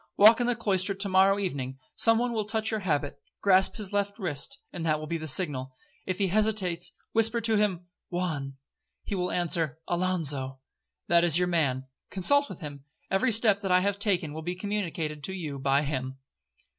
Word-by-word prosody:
Walk 220 +4 +7
in 240 - +1
the 245 - +1
cloister 200 -3 0
to 195 +1 -1
morrow 190 +1 +4
evening—some 145 - 0
one 240 +1 -1
will 215 -2 -1
touch 220 +1 -1
your 220 - -1
habit—grasp 185 +3 +1
his 205 -3 -6
left 200 0 -1
wrist, 180 - -2 0.2
that 165 -3 -1
will 155 - -6
be 165 +1 -3
the 155 - -6
signal. 135 -5 -1 0.3
If 185 -1 -2
he 195 -2 +1
hesitates, 200 -4 +1 0.2
whisper 225 +1 +3
to 225 0 +2
him—'Juan,' 175 -6 -3 0.5
he - - -5
will 180 -2 -1
answer—'Alonzo.' 165 -4 0 0.5
That 170 0 +4
is 170 -2 +3
your 180 0 +1
man, 135 -6 0 0.2
consult 285 +10 +4
with - - -9
him. 145 -3 -8 0.3
Every 210 +6 +2
step 215 -2 +3
that 195 -3 -3
I 180 0 +5
have 200 +1 -1
taken 180 -8 0
will 160 - -6
be 175 +3 -4
communicated 175 -7 -3
to 190 - -3
you 155 -7 -5
by 140 +1 +2
him.' 135 -2 -4
180 Hz, 175 wpm, -27 LUFS, 155-205 Hz, 0.5 s, Walk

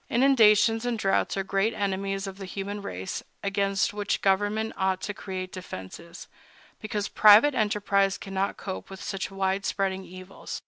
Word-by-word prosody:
Inundations 225 -3 +4
and 245 -1 -1
droughts 195 -1 0
are 195 - 0
great 200 +4 0
enemies 195 0 -2
of 195 0 -8
the 195 - -6
human 200 +2 -5
race, 95 - -5 0.2
against 200 0 0
which 205 -1 -2
government 205 +3 +1
ought 190 -1 0
to 205 - -4
create 185 -2 -6
defenses, 170 - -9 0.5
because 215 -2 -3
private 215 +7 +7
enterprise 205 -3 +1
cannot 195 0 -3
cope 190 -2 -6
with 195 0 -9
such 195 -2 -4
wide 195 0 -1
spreading 190 -2 -1
evils. 185 +1 -9
195 Hz, 150 wpm, -27 LUFS, 190-210 Hz, 0.5 s, private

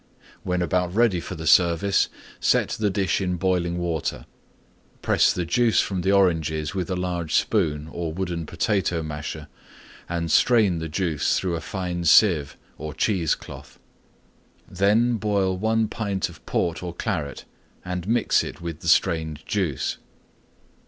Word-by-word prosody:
When 90 -1 -1
about 90 +1 0
ready 110 -6 +3
for 90 - -7
the 80 -1 -7
service, 85 +4 +3 0.3
set - - +2
the 105 -2 0
dish 95 -2 0
in 90 -1 -1
boiling 90 -1 0
water; 85 -3 -3 0.8
press - - +4
the 90 - -2
Juice 115 +6 +2
from 95 -2 -1
the 95 +2 +1
Oranges 80 -6 +1
with 90 -3 -3
a 95 - -1
large 90 -3 -2
spoon 80 -8 +1
or 85 -2 -4
wooden 85 -2 -4
potato 85 -2 0
masher 75 0 -6 0.6
and 85 -2 -2
strain 105 -4 +4
the 80 0 -5
Juice 80 -3 0
through 90 -3 -1
a 80 - -4
fine 90 0 -4
seive 75 -4 +4 0.2
or 75 0 -6
cheese 90 -8 +1
cloth. - - -12 0.9
Then 110 +6 +2
boil 100 -3 0
1 110 +3 +1
pint 100 -4 -2
of 80 -3 -15
Port 85 -2 -1
or 90 -1 -6
Claret 80 - -3 0.4
and 90 0 -4
mix 115 +1 +2
it - - -7
with 85 -2 -6
the - - -8
Strained 80 -2 +1
Juice. 85 - -2
90 Hz, 150 wpm, -24 LUFS, 80-100 Hz, 0.9 s, press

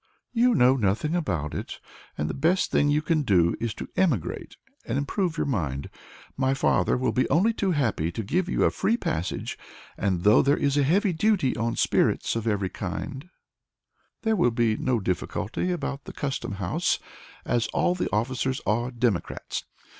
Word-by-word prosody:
"You 240 0 +4
know 130 -2 +5
nothing 115 - 0
about 85 - -2
it, - - -5 0.4
and 75 - -1
the 80 - -3
best 170 +6 +1
thing 145 - +3
you 150 +1 +2
can 155 0 +1
do 90 - +3
is 115 -1 -2
to - - -6
emigrate 150 - -1 0.3
and 115 - -2
improve 165 +4 -1
your - - 0
mind. 75 - -2 0.4
My 135 0 +1
father 135 - +2
will 130 0 0
be 130 - +1
only 190 +11 +3
too 200 -3 -1
happy 110 - 0
to 110 - -3
give 175 - 0
you - - +1
a - - +4
free 230 +3 +1
passage, 85 - -3 0.4
and 95 -3 0
though 105 +2 +6
there 140 +2 +3
is 140 -1 +1
a 145 - +3
heavy 180 +7 +2
duty 185 -6 +2
on 115 0 -1
spirits - - +1
of 115 0 -2
every 100 -3 +1
kind, 135 - -5 0.9
there 220 -1 +2
will 175 -11 +3
be 115 -1 +1
no 125 -1 0
difficulty 100 - -2
about 140 -5 -4
the - - -8
Custom 135 -7 -3
House, 95 -3 0 0.5
as 120 -1 +1
the 180 0 0
officers 130 +4 0
are 110 +4 +1
all - - -4
Democrats. 120 -6 -2
130 Hz, 175 wpm, -26 LUFS, 105-160 Hz, 0.9 s, though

